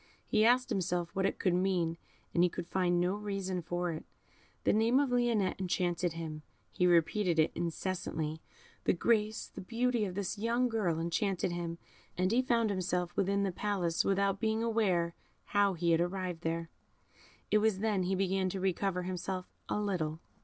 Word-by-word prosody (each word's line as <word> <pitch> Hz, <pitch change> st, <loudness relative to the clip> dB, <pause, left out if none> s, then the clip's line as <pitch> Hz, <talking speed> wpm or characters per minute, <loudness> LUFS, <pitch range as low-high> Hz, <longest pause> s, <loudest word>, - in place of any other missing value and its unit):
He 215 Hz, -, +3 dB
asked 250 Hz, +2 st, +4 dB
himself 180 Hz, -4 st, -1 dB
what 190 Hz, 0 st, +2 dB
it -, -, -3 dB
could 185 Hz, -, +1 dB
mean, 180 Hz, -3 st, +1 dB, 0.4 s
and 170 Hz, -, +3 dB
he 180 Hz, -, +5 dB
could 170 Hz, -, -5 dB
find 175 Hz, -1 st, +1 dB
no 180 Hz, +2 st, +2 dB
reason 195 Hz, -3 st, -3 dB
for 175 Hz, +1 st, -2 dB
it. 155 Hz, -, -5 dB, 0.6 s
The -, -, +3 dB
name 230 Hz, +4 st, +4 dB
of 280 Hz, -3 st, +1 dB
Lionette 235 Hz, -7 st, +1 dB
enchanted 175 Hz, -2 st, 0 dB
him. 160 Hz, -2 st, -5 dB, 0.3 s
He 180 Hz, -, +2 dB
repeated 175 Hz, +1 st, +3 dB
it 155 Hz, -, +4 dB
incessantly. 165 Hz, -2 st, -3 dB, 0.4 s
The -, -, +4 dB
grace, 215 Hz, +3 st, +1 dB
the -, -, -8 dB
beauty 235 Hz, +2 st, 0 dB
of 185 Hz, -2 st, -5 dB
this 200 Hz, +1 st, -3 dB
young 235 Hz, +3 st, +1 dB
girl 190 Hz, -8 st, 0 dB
enchanted 180 Hz, +2 st, 0 dB
him, 170 Hz, -1 st, -3 dB, 0.4 s
and 185 Hz, +2 st, +2 dB
he 240 Hz, +3 st, +4 dB
found 230 Hz, -4 st, +2 dB
himself 180 Hz, -2 st, -1 dB
within 200 Hz, +1 st, +1 dB
the 195 Hz, -, 0 dB
palace 180 Hz, -3 st, 0 dB
without 195 Hz, 0 st, +1 dB
being 220 Hz, 0 st, 0 dB
aware 190 Hz, -7 st, +1 dB, 0.3 s
how 200 Hz, -2 st, +2 dB
he 170 Hz, 0 st, +1 dB
had 165 Hz, 0 st, +4 dB
arrived 180 Hz, -1 st, -2 dB
there. 165 Hz, 0 st, -2 dB, 0.8 s
It 215 Hz, -, +5 dB
was 215 Hz, -2 st, +2 dB
then 210 Hz, -1 st, +1 dB
he 185 Hz, +1 st, 0 dB
began 190 Hz, 0 st, +1 dB
to 190 Hz, -, -4 dB
recover 185 Hz, 0 st, 0 dB
himself 185 Hz, 0 st, -4 dB, 0.2 s
a -, -, 0 dB
little. 170 Hz, -7 st, -1 dB
185 Hz, 175 wpm, -32 LUFS, 175-210 Hz, 0.8 s, he